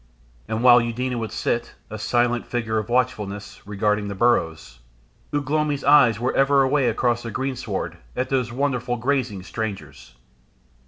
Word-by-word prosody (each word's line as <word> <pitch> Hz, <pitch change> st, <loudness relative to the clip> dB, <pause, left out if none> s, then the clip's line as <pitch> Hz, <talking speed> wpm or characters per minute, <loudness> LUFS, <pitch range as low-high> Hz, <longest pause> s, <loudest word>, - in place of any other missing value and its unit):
And 110 Hz, +1 st, -2 dB
while 125 Hz, -1 st, +8 dB
Eudena 120 Hz, +1 st, -2 dB
would 110 Hz, -1 st, -4 dB
sit, 120 Hz, 0 st, -2 dB, 0.2 s
a 110 Hz, -, -6 dB
silent 120 Hz, +2 st, 0 dB
figure 110 Hz, -2 st, -1 dB
of 110 Hz, +1 st, -6 dB
watchfulness, 105 Hz, -5 st, -2 dB
regarding 105 Hz, 0 st, 0 dB
the 100 Hz, -, -5 dB
burrows, 80 Hz, -, 0 dB, 0.5 s
Ugh 145 Hz, -2 st, -2 dB
lomi's 150 Hz, -1 st, 0 dB
eyes 135 Hz, -6 st, +5 dB
were 125 Hz, +2 st, -1 dB
ever 135 Hz, 0 st, +4 dB
away 135 Hz, -1 st, +2 dB
across 120 Hz, +1 st, 0 dB
the 115 Hz, -, -6 dB
greensward 130 Hz, -4 st, -4 dB, 0.2 s
at 130 Hz, -, -2 dB
those 125 Hz, -3 st, 0 dB
wonderful 125 Hz, -2 st, -1 dB
grazing 120 Hz, -6 st, -1 dB
strangers. 100 Hz, -, -6 dB
120 Hz, 150 wpm, -23 LUFS, 110-130 Hz, 0.5 s, while